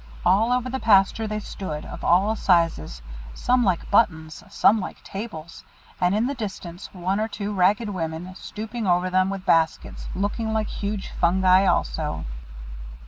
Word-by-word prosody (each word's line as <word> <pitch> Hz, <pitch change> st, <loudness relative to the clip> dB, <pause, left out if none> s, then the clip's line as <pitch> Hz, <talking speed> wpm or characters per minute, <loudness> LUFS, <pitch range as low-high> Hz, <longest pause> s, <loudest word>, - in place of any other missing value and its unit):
All 210 Hz, +6 st, +4 dB
over 250 Hz, 0 st, +1 dB
the 265 Hz, +1 st, -3 dB
pasture 215 Hz, 0 st, +3 dB
they 215 Hz, 0 st, -3 dB
stood, 170 Hz, -7 st, -6 dB
of -, -, -9 dB
all 195 Hz, +5 st, +3 dB
sizes, 165 Hz, -, +1 dB, 0.3 s
some 250 Hz, 0 st, +2 dB
like 185 Hz, -5 st, 0 dB
buttons, 160 Hz, -7 st, +1 dB
some 220 Hz, -, +4 dB
like 190 Hz, -, -7 dB
tables; 170 Hz, -6 st, -8 dB, 0.4 s
and 180 Hz, +2 st, +2 dB
in 220 Hz, +3 st, +1 dB
the 275 Hz, -, -1 dB
distance 190 Hz, -7 st, -7 dB
one 190 Hz, +2 st, -2 dB
or 220 Hz, -, 0 dB
two 205 Hz, -1 st, -4 dB
ragged 205 Hz, +4 st, +2 dB
women, 170 Hz, -1 st, -4 dB
stooping 220 Hz, +3 st, -6 dB
over 180 Hz, +1 st, +2 dB
them 185 Hz, +1 st, +2 dB
with 195 Hz, -1 st, -5 dB
baskets, 165 Hz, -3 st, +1 dB
looked 200 Hz, +4 st, -2 dB
like 220 Hz, -1 st, -1 dB
huge 200 Hz, -1 st, -4 dB
fungi 185 Hz, +2 st, +3 dB
also. -, -, -1 dB
195 Hz, 155 wpm, -24 LUFS, 175-215 Hz, 0.4 s, All